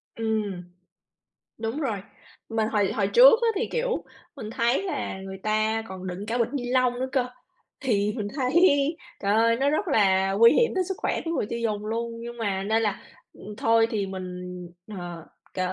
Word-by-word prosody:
Ừm. 215 -5 -2 1.0
Đúng 225 +7 -3
rồi. 225 -8 -1 0.5
Mình 220 -1 0
hồi 205 -3 +1
hồi 200 -3 +1
trước 485 - +7
á 465 - +4
thì, 460 - -1
kiểu, 480 0 -1 0.3
mình 215 -4 -6
thấy 235 +9 +1
là 370 - -3
người 190 0 -8
ta 215 +1 +1
còn 190 0 -7
đựng 185 +3 -5
cả 235 +2 -1
bịch 230 - +2
ni 250 -3 -2
lông 255 -1 +3
nữa 260 - -1
cơ. 255 -2 +1 0.5
Thì 210 -6 +1
mình 205 -2 -3
thấy 255 -2 0 0.7
trời 200 +1 +2
ơi, 230 +1 +4
nó 275 +3 +2
rất 350 +5 0
là 195 -5 +3
nguy 230 +4 +7
hiểm 475 - +3
tới 370 -1 +1
sức 385 +1 -3
khỏe - - -1
của 330 - -3
người 315 - -1
tiêu 235 - -3
dùng 215 -2 -2
luôn. 230 +1 -2
Nhưng 240 0 -7
mà 195 -3 -1
nên 220 +3 +1
là, 205 -3 -1 0.3
ừm, 210 +1 -10
thôi 225 0 +3
thì 205 -3 -1
mình, 185 -1 -6 0.6
ờ, 175 -2 -7 0.3
k - - -8
225 Hz, 195 wpm, -26 LUFS, 200-250 Hz, 1.0 s, trước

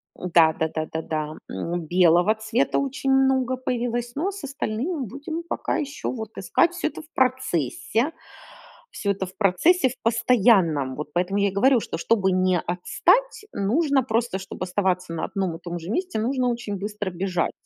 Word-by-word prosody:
Да 165 -3 +4
да 160 - -1
да 155 0 -3
да 160 - -2
да. 155 -1 -3
М, 170 - -3
белого 175 +4 +4
цвета 220 +4 0
очень 275 0 -1
много 265 -1 +3
появилось, 240 -1 -2
но 345 +8 -1
с 395 -4 -9
остальным 275 +2 -3
будем 295 - -6
пока 340 - -2
еще 285 0 -4
вот 220 -4 -7
искать, 320 - +2
всё 350 - -1
это - - -7
в 310 - -18
процессе, 255 - 0 0.8
всё 200 - -1
это 195 -1 -2
в 185 - -14
процессе 260 - +3
в 255 - -11
постоянном. 205 - +3
Вот 150 +1 -6
поэтому 185 +3 0
я 200 0 +3
и - - -7
говорю, 245 +6 +4
что 185 - -5
чтобы 190 +2 +2
не 185 -1 +2
отстать, 400 - +1
нужно 265 +7 +2
просто, 230 -4 -1
чтоб 190 - -9
оставаться 185 -2 -1
на 165 - -2
одном 190 -5 -2
и - - -21
том 175 0 -5
же 165 +2 -9
месте, 360 -2 -1
нужно 250 +2 0
очень 235 -4 -3
быстро 205 0 -4
бежать. 180 -1 -1
215 Hz, 175 wpm, -24 LUFS, 180-260 Hz, 0.8 s, Да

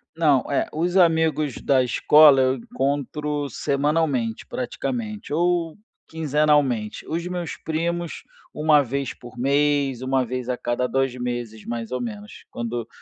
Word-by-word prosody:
Não, 150 -5 +3
é, 140 - +1
os 175 +3 -1
amigos 160 -5 +3
da 135 -2 +3
escola 145 +3 +6
eu 130 0 +2
encontro 145 +3 -2
semanalmente, 140 -4 0
praticamente, 240 - -4
ou 170 0 +1 0.3
quinzenalmente. 150 -7 +1
Os 170 +2 -2
meus 180 -2 -4
primos, 170 +1 -3 0.3
1 150 -1 +4
vez 135 +1 -3
por 120 +1 -13
mês, 140 -1 +1
1 130 0 +1
vez 125 0 -4
a 125 - -1
cada 120 +1 -1
2 135 0 0
meses, 120 -3 -5
mais 115 0 -5
ou 125 - -2
menos. 105 -4 -7
Quando 120 0 -4
140 Hz, 135 wpm, -23 LUFS, 125-160 Hz, 0.3 s, escola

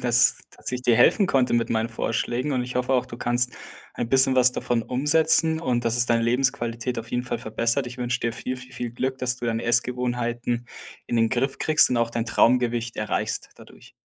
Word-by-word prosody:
dass 120 0 +4 0.3
ich 125 0 -4
dir 120 -3 +3
helfen 190 - +4
konnte 130 -7 +1
mit 120 -1 +1
meinen 110 0 -1
Vorschlägen 120 +5 -2
und 125 -1 0
ich 125 - -8
hoffe 125 +1 0
auch, 125 - +1
du 120 - -10
kannst 120 +1 0 0.4
ein 115 - -4
bisschen 130 0 +5
was 125 -1 +5
davon 120 -2 -2
umsetzen 160 +5 +2
und, 120 -6 -1
dass 115 +1 +1
es 120 - +6
deine 115 -1 +1
Lebensqualität 120 -1 -1
auf 115 +1 -8
jeden 125 0 -1
Fall 120 -1 -4
verbessert. 115 +3 -1
Ich 125 +1 -9
wünsch 125 +1 -2
dir 115 -1 -1
viel, 125 +2 -5
viel, 130 0 -13
viel 125 -2 -5
Glück, 130 +2 -3
dass 125 0 +1
du 120 - -8
deine 115 0 -2
Essgewohnheiten 120 0 -1 0.4
in 120 - -2
den 115 0 +3
Griff 130 +2 -1
kriegst 155 -4 +4
und 125 - 0
auch 115 0 0
dein 115 -1 -2
Traumgewicht 120 0 +1
erreichst, 105 - -3
dadurch. - - -17
120 Hz, 210 wpm, -24 LUFS, 115-130 Hz, 0.4 s, es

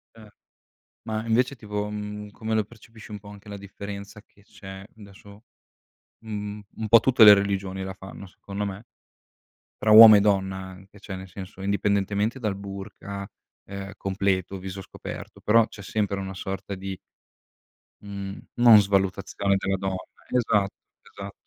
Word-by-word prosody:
Eh. 110 -2 -15 0.7
Ma 110 0 -3
invece 125 +4 +2
tipo, 105 -2 -4
mhmm, 105 0 -6
come 110 +1 -4
lo 110 - +2
percepisci 110 0 -15
un 105 - -6
po' 100 0 -13
anche 105 0 -13
la 100 - -6
differenza 100 +1 -9
che 100 -1 -26
c'è 95 -1 -11
adesso 100 0 -15 0.8
mh 115 - -15
mhmm, 105 0 -5
un 110 -1 -4
po' 115 +1 +8
tutte 125 -1 +6
le 105 -1 +11
religioni 100 -1 -2
la 95 0 -5
fanno 95 +1 -10
secondo 100 +2 -6
me. 100 +3 -6 0.9
Tra 110 - +1
uomo 110 0 +12
e - - +7
donna 95 -2 +1
anche, 95 +2 -11
cioè 95 -1 -7
nel 95 0 -9
senso 95 +1 -10
indipendentemente 100 +3 0
dal 105 -5 -1
burqa, 100 0 -7 0.4
ehm, 100 0 -7
completo, 95 -1 -1
viso 95 +1 -7
scoperto, - - -9
però 115 +1 +4
c'è 100 - -12
sempre 100 0 -2
una 95 0 -5
sorta 95 +1 -5
di 95 0 -6 1.1
mhmm, 100 -1 -7 0.2
non 120 -3 +8
svalutazione 100 0 0
della 95 0 -1
donna. 95 0 -2 0.3
Esa 115 -4 +3 0.5
esa 100 0 -8
100 Hz, 155 wpm, -25 LUFS, 95-105 Hz, 1.1 s, uomo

